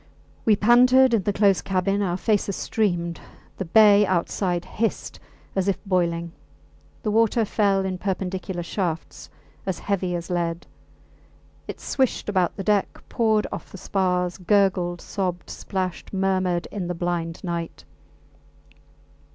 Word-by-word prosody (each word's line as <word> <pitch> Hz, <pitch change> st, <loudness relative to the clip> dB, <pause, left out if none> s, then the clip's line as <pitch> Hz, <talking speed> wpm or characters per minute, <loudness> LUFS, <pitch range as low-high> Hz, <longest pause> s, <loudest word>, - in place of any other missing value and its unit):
We 220 Hz, -, +5 dB
panted 250 Hz, +4 st, +5 dB
in 225 Hz, -, +3 dB
the 205 Hz, -, 0 dB
close 200 Hz, -1 st, +3 dB
cabin; 195 Hz, +1 st, 0 dB
our 180 Hz, -3 st, 0 dB
faces 205 Hz, -1 st, 0 dB
streamed; 175 Hz, -6 st, -1 dB, 0.4 s
the 190 Hz, -, -3 dB
bay 210 Hz, +3 st, +6 dB
outside 175 Hz, 0 st, -1 dB
hissed 220 Hz, +4 st, -3 dB, 0.4 s
as 190 Hz, 0 st, 0 dB
if 195 Hz, -, +1 dB
boiling; 170 Hz, -3 st, 0 dB, 0.7 s
the 215 Hz, -, 0 dB
water 225 Hz, +1 st, +3 dB
fell 200 Hz, -2 st, +1 dB
in 185 Hz, -1 st, -3 dB
perpendicular 185 Hz, -1 st, -3 dB
shafts 170 Hz, -2 st, -4 dB, 0.3 s
as 190 Hz, -2 st, -2 dB
heavy 185 Hz, -3 st, -1 dB
as 170 Hz, +1 st, -5 dB
lead; 170 Hz, -1 st, -2 dB, 1.0 s
it -, -, -7 dB
swished 260 Hz, -5 st, -1 dB
about 185 Hz, -4 st, +1 dB
the 195 Hz, -, -5 dB
deck, 205 Hz, 0 st, 0 dB
poured 220 Hz, -3 st, +2 dB
off -, -, -7 dB
the -, -, -9 dB
spars, 180 Hz, -2 st, -1 dB
gurgled, 180 Hz, -2 st, +1 dB
sobbed, 180 Hz, -3 st, -3 dB
splashed, 185 Hz, -2 st, -4 dB
murmured 185 Hz, -3 st, 0 dB
in 190 Hz, -4 st, -4 dB
the 180 Hz, -, -3 dB
blind 170 Hz, -1 st, -3 dB
night. 170 Hz, -2 st, -4 dB
190 Hz, 135 wpm, -24 LUFS, 175-205 Hz, 1.0 s, bay